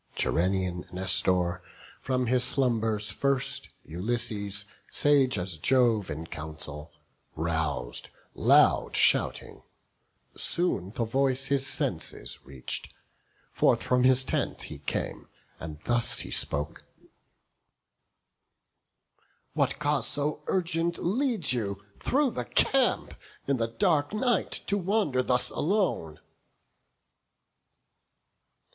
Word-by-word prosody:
Gerenian 90 +1 0
Nestor 90 -1 +1 0.4
from 130 -1 0
his 125 +1 +2
slumbers 110 -5 0
first 140 0 -1 0.2
Ulysses, 100 +2 -3 0.2
sage 140 -3 +3
as 90 -2 0
Jove 115 +1 +2
in 80 +3 -5
council, 75 -1 -7 0.4
rous'd, 80 -7 -1 0.2
Loud - - +4
shouting; - - +2 0.7
soon 135 - +1
the 120 - 0
voice 135 +3 +1
his 140 -1 +1
senses - - -2
reach'd; 65 -2 -6 0.6
Forth - - +2
from 125 0 +2
his 130 0 +5
tent - - -2
he 75 - -8
came, 70 - -4 0.3
and 80 -1 -7
thus 120 +1 +3
he - - -7
spoke: 75 +1 0 2.7
"What - - +1
cause 150 -1 0
so 145 +1 -1
urgent 170 -2 0
leads 220 - +1
you, 100 -4 -3
through 275 -1 +1
the 125 - -4
camp, - - +2 0.3
In 140 -1 +1
the 115 -1 0
dark 150 - +1
night 240 +2 +1 0.2
to 200 0 0
wander 190 -9 +1
thus 125 0 +1
alone?" 155 - -1
120 Hz, 100 wpm, -28 LUFS, 90-140 Hz, 2.7 s, his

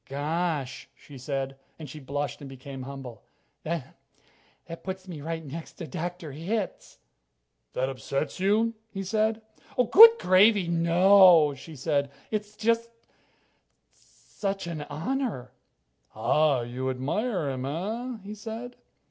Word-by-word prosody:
"Gosh 150 -1 -2
" - - -44
she 140 -3 -13
said, 135 0 -4 0.2
and 155 - -8
she 150 +3 -9
blushed 145 0 -4
and 140 - -8
became 135 0 -9
humble 135 -3 -8 0.4
"that 165 0 -5 0.7
that 165 0 -9
puts 190 0 -6
me 165 -5 -7
right 160 +1 -4
next 160 +4 -8
to 170 - -7
Dr. 175 +1 -5
Hitz." 185 +8 -4 0.8
"That 130 - 0
upsets 135 +4 -3
you?" 215 +4 +2 0.2
he 195 -2 -5
said. 220 +2 0 0.5
"Good 455 +3 +11
gravy, 190 - +5
no!" 170 -1 +6
she 155 +4 -11
said. 140 0 0 0.2
"It's 210 -1 -3
it's - - -31
just 230 +1 +1 1.0
such 195 -2 -6
an 165 -3 -5
honor." 200 - -3 0.6
"Ah, 130 +4 +2
You... 120 +2 -5
you - - +1
admire 155 - -1
him, 130 0 -4
eh?" 220 - -3
he 205 +1 -7
said. 225 +3 -7
165 Hz, 135 wpm, -27 LUFS, 140-200 Hz, 1.0 s, Good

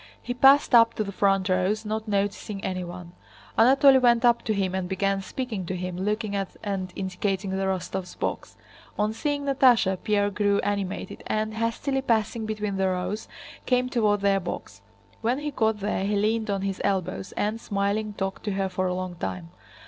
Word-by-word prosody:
He 245 - -4
passed 270 +3 +5
up 230 -1 +6
to 215 - 0
the 200 - -5
front 195 -1 +2
rows, 190 +4 +1
not 220 +1 -3
noticing 200 0 -2
anyone. 180 -1 -5 0.4
Anatole 265 +3 +6
went 240 -1 +4
up 235 -1 +4
to 215 - +1
him 190 -2 0
and 190 -1 -2
began 195 +1 0
speaking 225 -2 -4
to 185 - -2
him, 180 0 -4
looking 210 +2 -2
at 195 -1 -4
and 195 -3 -3
indicating 190 +1 -2
the 190 0 -1
Rostóvs' 185 -1 -3
box. - - -4 0.4
On 210 +1 +1
seeing 285 +4 -2
Natásha 245 -9 +4
Pierre 205 -1 +1
grew 205 0 +2
animated 200 -2 -3
and, 215 0 -1
hastily 230 +5 -1
passing 225 -2 0
between 210 -2 -2
the 190 0 +2
rows, 185 +3 -2 0.4
came 250 0 +2
toward 210 -5 +2
their 200 -1 +3
box. 175 -2 -7 0.4
When 235 +3 +1
he 295 +1 -3
got 220 -5 0
there 200 -1 -1
he 205 +1 0
leaned 215 +2 +1
on 195 -1 -1
his 195 -1 -3
elbows 190 -1 -1
and, 215 +2 -2
smiling, 205 +1 -1
talked 195 -1 -4
to 205 - -1
her 195 0 -1
for 185 0 -1
a 180 - -1
long 185 -1 -4
time. 90 - -5
205 Hz, 185 wpm, -26 LUFS, 190-225 Hz, 0.4 s, up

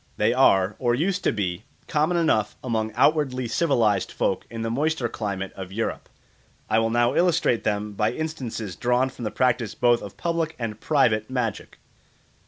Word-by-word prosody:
They - - +2
are, 95 +1 +4
or 120 -2 +2
used 185 +7 -1
to - - +4
be, 90 -1 -3 0.2
common 155 +3 +1
enough 160 -11 +1
among 110 -3 -1
outwardly 130 -2 +2
civilised 115 - +1
folk - - -1
in 115 -1 -5
the 115 - -2
moister 145 0 0
climate 100 -4 -4
of 95 -1 -7
Europe. 115 +3 -3 0.6
I 110 +1 +3
will 115 0 +1
now 120 +1 +2
illustrate 170 -9 +2
them 105 0 -1
by 105 +2 0
instances 125 - -5
drawn 125 +2 +1
from 125 -2 -8
the - - 0
practice 120 -2 0
both 120 -1 +3
of 100 - -9
public 165 -1 -1
and 110 -3 -4
private 110 -8 +2
magic. 125 -5 -3
120 Hz, 170 wpm, -24 LUFS, 110-145 Hz, 0.6 s, are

